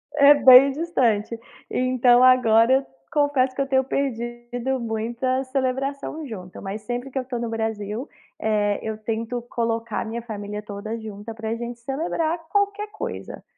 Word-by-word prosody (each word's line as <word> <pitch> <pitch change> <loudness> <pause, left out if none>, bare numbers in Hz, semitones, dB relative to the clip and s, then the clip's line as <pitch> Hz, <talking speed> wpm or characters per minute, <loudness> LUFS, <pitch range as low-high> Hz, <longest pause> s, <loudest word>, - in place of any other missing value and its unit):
É 285 0 +8
bem 270 -1 +8
distante. 245 -9 0 0.3
Então, 250 -1 +4
agora, 250 -2 +5
eu 270 +1 +2 0.3
confesso 280 -3 +2
que 275 - -1
eu 275 - -1
tenho 265 -1 +3
perdido 245 -1 -3
muita 235 +3 -1
celebração 275 +3 -2
junta. 185 -6 -9
Mas 200 +2 -5
sempre 245 +3 -4
que 265 - -5
eu 255 - -4
tô 250 -2 -4
no 235 -1 -3
Brasil, 220 +2 -3 0.3
eh, 210 -2 +1
eu 220 -1 -4
tento 225 +2 -3
colocar 230 -1 -2
a - - -4
minha 230 +2 -4
família 210 -2 -6
toda 210 +2 -6
junta 215 0 -8
pra 220 0 -4
gente 235 0 -6
celebrar 315 +6 -2
qualquer 405 +1 0
coisa. 420 - -6
240 Hz, 155 wpm, -23 LUFS, 220-265 Hz, 0.3 s, É